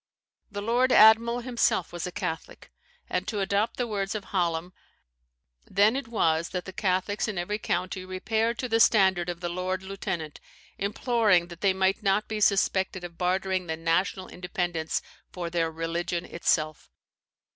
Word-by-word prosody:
The 205 -1 -5
lord 245 +4 +2
admiral 230 +2 +6
himself 235 -8 0
was 175 0 -4
a - - -5
Catholic, 160 -2 -5 0.4
and - - -2
(to 210 - -2
adopt 200 +3 0
the 245 - 0
words 200 -3 -2
of 210 - -3
Hallam) 175 -2 -1 1.0
"then 205 +5 +4
it 275 -2 -3
was 165 -7 +1
that 180 -1 -4
the 190 - -8
Catholics 190 +2 0
in 210 -3 -4
every 205 +5 -2
county 185 0 -2
repaired 220 +5 -1
to 255 - -2
the 225 -1 +2
standard 190 -6 +4
of 175 0 -5
the 175 - -2
lord 185 +1 -3
lieutenant, 175 -5 -5 0.4
imploring 205 -3 +2
that 175 -1 -11
they 195 - +4
might 190 +2 +1
not 200 +1 +1
be 215 -1 -3
suspected 190 -2 +2
of 170 -1 -9
bartering 185 0 0
the 160 0 -3
national 165 +3 0
independence 175 -2 -3 0.3
for 175 -2 -5
their 165 -1 +1
religion 170 +2 -3
itself." 155 -2 -1
190 Hz, 160 wpm, -27 LUFS, 175-210 Hz, 1.0 s, admiral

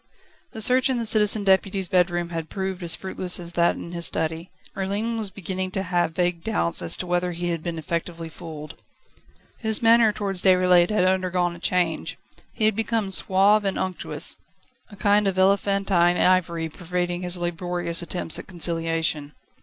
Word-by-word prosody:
The 220 - -6
search 255 +4 +4
in 260 - 0
the 235 - -2
Citizen 210 -1 +3
Deputy's 190 0 +2
bedroom 175 -2 +1
had 165 -2 -5
proved 190 -1 -4
as 170 -2 0
fruitless 185 -1 -4
as 170 -1 -6
that 170 0 +2
in 170 - -8
his 170 -1 +2
study. 160 +2 -3 0.3
Merlin 205 +4 -2
was 220 -3 -2
beginning 185 -1 -4
to 195 - -1
have 175 -3 -1
vague 175 -2 0
doubts 85 0 0
as 85 - -1
to - - -4
whether 180 0 -1
he 175 +1 -3
had 165 -2 -3
been 170 0 -4
effectively 165 +1 -4
fooled. 155 -2 -10 0.8
His 220 0 +3
manner 230 -1 +5
towards 200 -3 -3
Déroulède 180 -2 +4
had 210 -4 +2
undergone 185 -2 0
a - - -12
change. 175 -3 -1 0.3
He 220 - -1
had 215 -1 +2
become 225 -2 -1
suave 195 +3 +4
and 195 -1 -1
unctuous, 185 -1 -3 0.5
a 205 - -12
kind 205 0 +2
of 190 -1 -1
elephantine 195 -2 +2
irony 170 -3 +2
pervading 175 +1 -3
his 180 0 -3
laborious 175 0 -2
attempts 170 -1 -2
at - - -10
conciliation. 165 -4 -1
180 Hz, 170 wpm, -24 LUFS, 170-195 Hz, 0.8 s, manner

